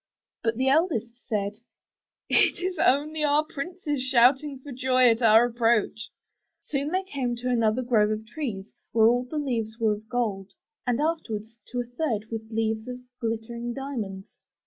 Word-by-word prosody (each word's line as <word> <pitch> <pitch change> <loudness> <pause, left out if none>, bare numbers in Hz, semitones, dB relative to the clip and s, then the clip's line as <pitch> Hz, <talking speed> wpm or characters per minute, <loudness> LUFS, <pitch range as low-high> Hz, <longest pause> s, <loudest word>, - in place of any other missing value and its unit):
'* - - -63
But 225 -1 0
the 260 +1 +1
eldest 265 - +1
said, 210 -3 -2 0.7
*Tt - - +3
is 365 -1 -3
only 305 +3 +2
our 295 +1 +3
princes 310 -1 -4
shouting 265 +3 +3
for 275 +2 -11
joy 255 -1 +4
at 225 +2 -1
our 225 0 +7
approach.'' 230 -2 +1 0.5
Soon 280 -1 -3
they 370 +3 0
came 265 -9 -2
to 250 +1 -2
another 230 +1 +2
grove 220 -4 +3
of 215 0 -3
trees 225 -6 -4 0.3
where 220 -1 +5
all 245 +2 +4
the 305 +5 -5
leaves 230 -6 -2
were 220 -2 +2
of 215 +1 -9
gold, 200 -5 -2 0.3
and 245 0 +1
afterward, 295 -9 -1 0.2
to 245 0 -2
a - - -6
third 240 -4 -3
with 220 -1 -5
leaves 220 0 -1
of 250 0 -5 0.2
glittering 235 +1 -3
diamonds. 220 -9 -6
240 Hz, 170 wpm, -26 LUFS, 220-275 Hz, 0.7 s, our